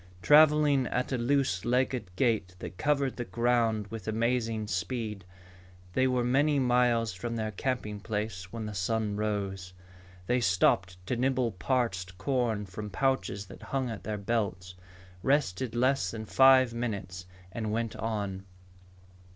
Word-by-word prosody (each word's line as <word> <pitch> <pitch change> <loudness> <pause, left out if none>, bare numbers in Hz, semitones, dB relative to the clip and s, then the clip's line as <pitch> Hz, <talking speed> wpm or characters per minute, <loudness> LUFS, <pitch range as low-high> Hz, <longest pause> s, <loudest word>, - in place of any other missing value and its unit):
Traveling 150 -3 +5
at 125 +2 -2
a 130 - +1
loose 120 -7 +1
legged 125 -3 0
gait 105 -5 0
that 90 0 -9
covered 140 -3 +1
the 120 - -2
ground 115 -3 +1
with 110 -3 -7
amazing 115 0 0
speed, 105 0 -3 0.7
they 130 +4 +3
were 125 -1 +1
many 140 +4 +2
miles 120 -4 +2
from 115 +6 -4
their 110 -1 -2
camping 105 -2 -3
place 105 -3 -4
when 115 -2 -5
the 105 - -5
sun 105 +2 -1
rose. 100 -3 -3 0.5
They 125 +6 +2
stopped 95 -2 +2
to 125 - -1
nibble 130 -1 +1
parched 95 -3 -2
corn 120 -3 0
from 105 +2 -7
pouches 105 -5 -1
that 95 - -13
hung 130 -3 -2
at 110 - -7
their 105 0 -3
belts, 100 -4 -2 0.5
rested 130 -3 0
less 130 -5 +2
than 110 0 -6
five 130 0 +5
minutes, 100 -6 -4 0.2
and 110 +1 -3
went 115 0 -2
on. 100 -3 -3
115 Hz, 145 wpm, -29 LUFS, 100-125 Hz, 0.7 s, Traveling